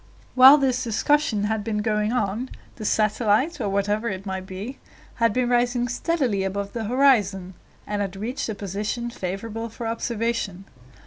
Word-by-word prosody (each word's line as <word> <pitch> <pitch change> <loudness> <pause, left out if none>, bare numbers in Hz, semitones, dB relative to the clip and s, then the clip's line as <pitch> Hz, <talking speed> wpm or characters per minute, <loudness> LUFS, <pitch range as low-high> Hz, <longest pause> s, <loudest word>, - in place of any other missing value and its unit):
While 265 +3 +9
this 255 -3 +1
discussion 235 -1 +1
had 215 0 -1
been 210 -1 -2
going 210 0 0
on, 240 +1 -1 0.3
the 215 - -6
satellite, 215 +9 +1
or 200 - -1
whatever 205 +3 0
it 190 0 -5
might 190 -1 -4
be, 200 +8 -7 0.4
had 230 -2 +3
been 250 +3 0
rising 245 0 +1
steadily 250 - 0
above 200 +1 -3
the 230 -2 -3
horizon, 205 -7 +2 0.3
and 205 0 -2
had 195 -1 -3
reached 230 +6 -4
a 220 - -3
position 210 +5 -3
favorable 225 +3 -5
for 230 +1 -7
observation. 225 -4 -2
220 Hz, 155 wpm, -24 LUFS, 200-245 Hz, 0.4 s, While